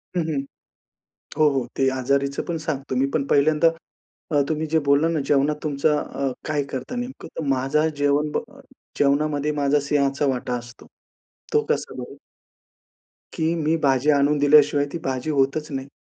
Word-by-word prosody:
हं, 175 - +2
हं. 140 - -1 1.0
हो, 155 - +5
हो. 135 -3 -1
ते 135 - +3
आजारीचं 140 +2 0
पण 170 -2 -2
सांगतो 140 -4 -3
मी 130 +2 +2
पण 140 - 0
पहिल्यांदा 155 +3 +3 0.6
अ, 145 - +3
तुम्ही 155 0 -1
जे 160 +1 +2
बोलला 140 +3 +4
ना 165 -2 0
जेवणात 145 +1 +2
तुमचं 150 0 +1
अ, 135 -2 -3 0.2
काय 150 -2 0
करता 130 - -5
नेमकं 245 +2 -6
तर 160 - -2
माझा 135 +4 +1
जेवण 145 +1 +1
ब - - 0 0.6
जेवणामध्ये 145 +1 +1
माझा 145 0 +1
सिंहाचा 140 0 0
वाटा 125 -1 -2
असतो. 120 0 -12 0.7
तो 445 - +4
कसा - - -1
बरं? - - -8 1.2
की 160 -1 0
मी 160 0 +1
भाजी 135 +1 +2
आणून 145 +1 +2
दिल्याशिवाय 145 0 +5
ती - - -2
भाजी 130 +2 -2
होतच 145 +1 +1
नाही. 135 0 -4
145 Hz, 160 wpm, -23 LUFS, 135-155 Hz, 1.2 s, हो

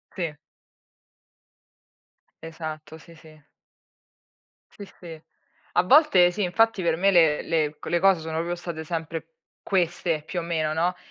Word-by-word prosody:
Sì. 170 -5 -3 2.1
Esatto, 160 -1 -8
sì 165 +1 -17
sì. 155 -1 -17 1.3
Sì, 200 - -11
sì. 165 -3 -10 0.5
A 175 - +3
volte, 190 - +5
sì, 205 +3 -3
infatti, 215 +3 +2
per 165 -1 +1
me, 195 +3 +2
le 160 -4 +4
le 155 -2 -1
c - - -12
le 170 - +1
cose 195 -1 +4
sono 160 0 -5
proprio 170 +2 -2
state 170 -2 -7
sempre 165 0 -5 0.3
queste, 175 -4 -1
più 180 - -4
o - - -3
meno, 160 -2 -1
no, 175 +3 0
165 Hz, 140 wpm, -25 LUFS, 160-180 Hz, 2.1 s, volte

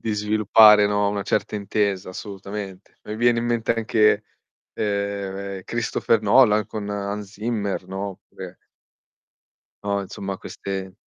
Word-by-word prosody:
Di 110 -2 -2
sviluppare, 105 0 +6
no, 105 0 +1
una 100 0 -2
certa 105 +1 -1
intesa 100 -2 -1
assolutamente. 100 0 -8
Mi 105 +1 -6
viene 120 0 +3
in - - -3
mente 115 -1 0
anche, 110 -2 +2 0.5
ehm, 100 -2 -3
Kristopher 115 -1 0
Nolan 105 -1 +4
con 105 -2 -6
Hans 100 0 -4
Zimmer, 105 -4 -3
no, 95 +2 -4
oppure 95 - -11 1.3
no, 100 0 0
insomma 95 0 -6
queste 95 -1 -6
105 Hz, 125 wpm, -23 LUFS, 100-110 Hz, 1.3 s, sviluppare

